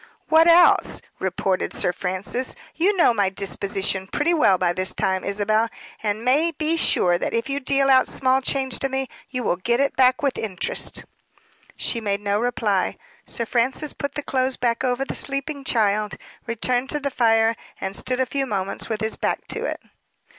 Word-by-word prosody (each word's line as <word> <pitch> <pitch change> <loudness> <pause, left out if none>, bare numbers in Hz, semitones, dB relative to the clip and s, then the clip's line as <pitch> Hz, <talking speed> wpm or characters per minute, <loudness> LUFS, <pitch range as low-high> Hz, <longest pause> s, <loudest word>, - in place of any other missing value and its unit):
"What 320 +1 +6
else?" 345 +1 +5 0.2
retorted 190 0 -1
Sir 180 - 0
Francis. 195 +8 -3 0.2
"You 385 +5 +1
know 335 -8 +5
my 200 -4 +1
disposition 195 0 -1
pretty 300 - +1
well 250 - +4
by 175 -1 +1
this 185 +1 -1
time, 190 0 0
Isabel, 215 +3 +1 0.3
and 215 +1 -2
may 295 +7 +3
be 320 0 -1
sure 175 - +3
that - - -2
if 230 +4 -1
you 280 - -1
deal 275 0 +1
out 260 -1 +5
small 260 0 +2
change 265 -1 0
to 270 - 0
me, 265 0 -2 0.2
you 255 -2 -3
will 175 - 0
get 235 +6 0
it 280 0 +1
back 255 -1 +5
again - - -15
with 275 -2 0
interest." 190 -5 -2 0.7
She 230 - -1
made 200 -2 -1
no 205 0 0
reply. 215 -5 0 0.3
Sir 230 - -1
Francis 255 +6 0
put 280 - -5
the 295 - -3
clothes 260 -1 0
back 235 0 0
over 255 +1 0
the - - -5
sleeping 275 +1 -2
child, 210 -4 +1 0.3
returned 245 +3 -1
to 295 - -2
the 280 -1 -3
fire, 225 -2 +3 0.2
and 190 +1 -4
stood 255 0 -1
a 260 - +2
few 270 +2 -2
moments 195 -2 -3
with 220 -1 -2
his 220 0 -2
back - - -2
to - - -3
it. - - -3
240 Hz, 190 wpm, -23 LUFS, 200-275 Hz, 0.7 s, What